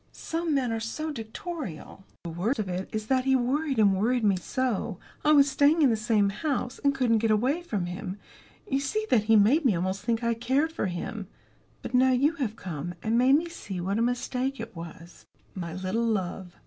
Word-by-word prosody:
Some 325 Hz, -2 st, -2 dB
men 255 Hz, -4 st, +1 dB
are 225 Hz, -, -1 dB
so 310 Hz, +8 st, -4 dB
dictatorial. 225 Hz, -, -7 dB, 0.2 s
"The 170 Hz, -, -5 dB
worst 195 Hz, +11 st, -1 dB
of 215 Hz, -, -2 dB
it 185 Hz, +1 st, -4 dB
is 215 Hz, -1 st, -3 dB
that 260 Hz, +2 st, +1 dB
he 265 Hz, 0 st, +4 dB
worried 270 Hz, +3 st, 0 dB
and 200 Hz, -3 st, +5 dB
worried 235 Hz, +5 st, +1 dB
me 200 Hz, -2 st, +4 dB
so 225 Hz, 0 st, -2 dB, 0.3 s
I 300 Hz, -, +4 dB
was 285 Hz, -2 st, +6 dB
staying 290 Hz, +3 st, +4 dB
in 265 Hz, -, +5 dB
the -, -, +2 dB
same 215 Hz, -2 st, +2 dB
house, 250 Hz, +3 st, -2 dB
and 280 Hz, -1 st, +3 dB
couldn't 240 Hz, -4 st, +2 dB
get 225 Hz, +1 st, +1 dB
away 255 Hz, +10 st, +2 dB
from 210 Hz, -, -3 dB
him, 180 Hz, +2 st, -5 dB, 0.5 s
you 270 Hz, -, +1 dB
see 430 Hz, +11 st, -1 dB
that 220 Hz, -4 st, +4 dB
he 225 Hz, 0 st, +5 dB
made 230 Hz, +10 st, +5 dB
me 240 Hz, -8 st, +3 dB
almost 185 Hz, +3 st, -2 dB
think 230 Hz, +1 st, -1 dB
I 235 Hz, 0 st, +2 dB
cared 260 Hz, +7 st, 0 dB
for 320 Hz, -, -2 dB
him. 185 Hz, +3 st, -5 dB, 0.6 s
But -, -, -6 dB
now 255 Hz, +1 st, +5 dB
you 275 Hz, +5 st, +3 dB
have 235 Hz, -7 st, -2 dB
come, 175 Hz, -4 st, -6 dB
and 225 Hz, +1 st, +1 dB
made 255 Hz, +3 st, +5 dB
me 330 Hz, +3 st, +1 dB
see 205 Hz, -, -7 dB
what 195 Hz, +5 st, -1 dB
a -, -, +2 dB
mistake 250 Hz, +2 st, -1 dB
it 225 Hz, -3 st, -7 dB
was." 165 Hz, +1 st, -11 dB, 0.3 s
"My 170 Hz, -3 st, -5 dB
little 190 Hz, +5 st, -1 dB
love." 190 Hz, -4 st, -2 dB
230 Hz, 210 wpm, -27 LUFS, 195-270 Hz, 0.6 s, was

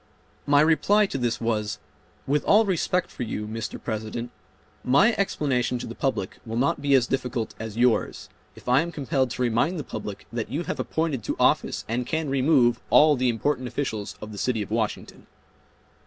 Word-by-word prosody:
My 145 Hz, 0 st, +5 dB
reply 165 Hz, +7 st, +4 dB
to 135 Hz, -, -4 dB
this 120 Hz, -2 st, -1 dB
was, 105 Hz, -2 st, -1 dB, 0.5 s
"With 145 Hz, +2 st, +1 dB
all 220 Hz, +2 st, +5 dB
respect 180 Hz, -1 st, 0 dB
for -, -, -9 dB
you, 105 Hz, -2 st, -3 dB
Mr. 110 Hz, +1 st, -5 dB
President, 110 Hz, +2 st, -4 dB, 0.5 s
my 140 Hz, -, +4 dB
explanation 140 Hz, -, 0 dB
to -, -, -6 dB
the 115 Hz, -, -6 dB
public 130 Hz, -7 st, -2 dB
will 115 Hz, -1 st, -5 dB
not 135 Hz, +3 st, +1 dB
be 140 Hz, -1 st, +3 dB
as 125 Hz, -3 st, +4 dB
difficult 125 Hz, -3 st, -2 dB
as 110 Hz, -1 st, -6 dB
yours, 120 Hz, -1 st, +1 dB, 0.3 s
if -, -, -16 dB
I 125 Hz, +3 st, +5 dB
am 170 Hz, +1 st, -4 dB
compelled 135 Hz, -4 st, 0 dB
to 125 Hz, -, -2 dB
remind 120 Hz, +10 st, +1 dB
the 150 Hz, -, -3 dB
public 105 Hz, -4 st, -7 dB
that 115 Hz, -2 st, -3 dB
you 145 Hz, +8 st, -2 dB
have -, -, -4 dB
appointed 160 Hz, -8 st, -1 dB
to -, -, -2 dB
office -, -, +2 dB
and 120 Hz, +2 st, -2 dB
can 160 Hz, -1 st, -1 dB
remove 130 Hz, -3 st, +3 dB
all 150 Hz, 0 st, +6 dB
the 130 Hz, -1 st, +1 dB
important 130 Hz, +3 st, -1 dB
officials 110 Hz, -6 st, -4 dB
of 105 Hz, -, -7 dB
the 100 Hz, -, -7 dB
city 115 Hz, -2 st, 0 dB
of 105 Hz, -, -12 dB
Washington." 110 Hz, -1 st, -3 dB
125 Hz, 185 wpm, -25 LUFS, 115-145 Hz, 0.5 s, all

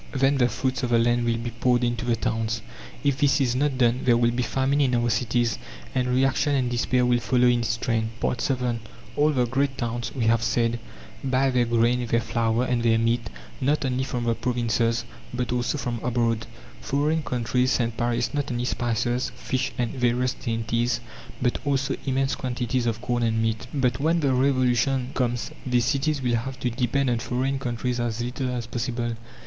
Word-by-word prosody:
Then 135 Hz, +1 st, +3 dB
the 125 Hz, -1 st, +4 dB
fruits 130 Hz, +3 st, -1 dB
of 125 Hz, -, -1 dB
the 120 Hz, -, +4 dB
land 120 Hz, +1 st, +2 dB
will 115 Hz, -1 st, +1 dB
be 120 Hz, +1 st, -4 dB
poured 120 Hz, +1 st, +1 dB
into 120 Hz, 0 st, -1 dB
the 120 Hz, -1 st, +2 dB
towns. 115 Hz, -1 st, -2 dB, 0.4 s
If 140 Hz, -2 st, +1 dB
this 140 Hz, -1 st, +3 dB
is 125 Hz, -3 st, +1 dB
not 140 Hz, 0 st, +1 dB
done 120 Hz, -1 st, +3 dB
there 120 Hz, -2 st, +4 dB
will 120 Hz, 0 st, +3 dB
be 120 Hz, +1 st, -1 dB
famine 135 Hz, +4 st, +1 dB
in 130 Hz, -3 st, +2 dB
our 120 Hz, 0 st, +1 dB
cities, 120 Hz, +1 st, 0 dB, 0.3 s
and 125 Hz, -1 st, +1 dB
reaction 135 Hz, +3 st, +2 dB
and 125 Hz, -2 st, 0 dB
despair 125 Hz, +1 st, +2 dB
will 120 Hz, 0 st, +3 dB
follow 125 Hz, +1 st, +2 dB
in 120 Hz, -1 st, +4 dB
its 115 Hz, -1 st, -1 dB
train. 115 Hz, -1 st, 0 dB
VII 125 Hz, -1 st, 0 dB, 0.4 s
All 150 Hz, +1 st, +4 dB
the 130 Hz, -5 st, +2 dB
great 135 Hz, +3 st, 0 dB
towns, 120 Hz, 0 st, -3 dB
we 120 Hz, -4 st, 0 dB
have 115 Hz, 0 st, +3 dB
said, 115 Hz, 0 st, +1 dB, 0.4 s
buy 135 Hz, 0 st, +2 dB
their 125 Hz, -1 st, +2 dB
grain, 120 Hz, +1 st, +2 dB
their 115 Hz, 0 st, +2 dB
flour, 115 Hz, 0 st, 0 dB
and 125 Hz, -2 st, 0 dB
their 115 Hz, -1 st, +3 dB
meat, 115 Hz, +1 st, 0 dB, 0.3 s
not 145 Hz, +2 st, +1 dB
only 130 Hz, 0 st, 0 dB
from 125 Hz, -2 st, -3 dB
the 115 Hz, -1 st, +2 dB
provinces, 115 Hz, -1 st, 0 dB, 0.3 s
but 125 Hz, -1 st, -2 dB
also 125 Hz, +4 st, 0 dB
from 120 Hz, -4 st, -3 dB
abroad. 115 Hz, -2 st, 0 dB, 0.3 s
Foreign 150 Hz, +3 st, +1 dB
countries 125 Hz, 0 st, 0 dB
send 115 Hz, -2 st, 0 dB
Paris 120 Hz, 0 st, 0 dB
not 145 Hz, -1 st, -1 dB
only 120 Hz, 0 st, -1 dB
spices, 120 Hz, +1 st, -1 dB
fish, 130 Hz, 0 st, -2 dB
and 120 Hz, -2 st, 0 dB
various 125 Hz, 0 st, +1 dB
dainties, 115 Hz, 0 st, -1 dB, 0.4 s
but 125 Hz, -1 st, 0 dB
also 135 Hz, -2 st, 0 dB
immense 135 Hz, 0 st, +1 dB
quantities 125 Hz, -1 st, -1 dB
of 115 Hz, -1 st, -1 dB
corn 120 Hz, -1 st, -1 dB
and 115 Hz, -1 st, +1 dB
meat. 115 Hz, +2 st, -1 dB
But 125 Hz, -4 st, 0 dB
when 165 Hz, +3 st, +2 dB
the 140 Hz, -3 st, +2 dB
Revolution 130 Hz, 0 st, +2 dB
comes 120 Hz, -2 st, -1 dB
these 125 Hz, -2 st, +1 dB
cities 140 Hz, +1 st, 0 dB
will 120 Hz, -2 st, +2 dB
have 130 Hz, +3 st, -5 dB
to 125 Hz, -, 0 dB
depend 125 Hz, +2 st, +1 dB
on 120 Hz, -, 0 dB
foreign 130 Hz, +3 st, -1 dB
countries 125 Hz, -1 st, -2 dB
as 120 Hz, -1 st, -2 dB
little 125 Hz, +2 st, -2 dB
as 125 Hz, -2 st, -3 dB
possible. 120 Hz, 0 st, -2 dB
125 Hz, 195 wpm, -25 LUFS, 120-130 Hz, 0.4 s, the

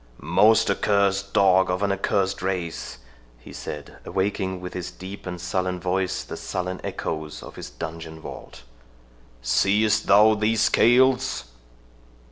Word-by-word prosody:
"Most 95 Hz, +9 st, +4 dB
accursed 100 Hz, -1 st, +1 dB
dog 95 Hz, -1 st, +4 dB
of 90 Hz, +2 st, -1 dB
an 100 Hz, -, +1 dB
accursed 95 Hz, 0 st, 0 dB
race," 90 Hz, -9 st, -3 dB, 0.4 s
he -, -, -13 dB
said, 75 Hz, -1 st, -8 dB
awaking 95 Hz, -1 st, -2 dB
with 90 Hz, 0 st, -7 dB
his 90 Hz, -1 st, -4 dB
deep 95 Hz, +1 st, -9 dB
and 90 Hz, -1 st, -5 dB
sullen 90 Hz, +1 st, -2 dB
voice 95 Hz, +1 st, -1 dB
the -, -, -7 dB
sullen 90 Hz, 0 st, -4 dB
echoes 75 Hz, -1 st, -5 dB
of -, -, -11 dB
his -, -, -8 dB
dungeon 80 Hz, +5 st, -7 dB
vault, -, -, -10 dB, 0.8 s
"seest 105 Hz, -, +2 dB
thou 105 Hz, +2 st, +7 dB
these 110 Hz, +1 st, +1 dB
scales?" 130 Hz, -, +3 dB
95 Hz, 130 wpm, -24 LUFS, 90-100 Hz, 0.8 s, thou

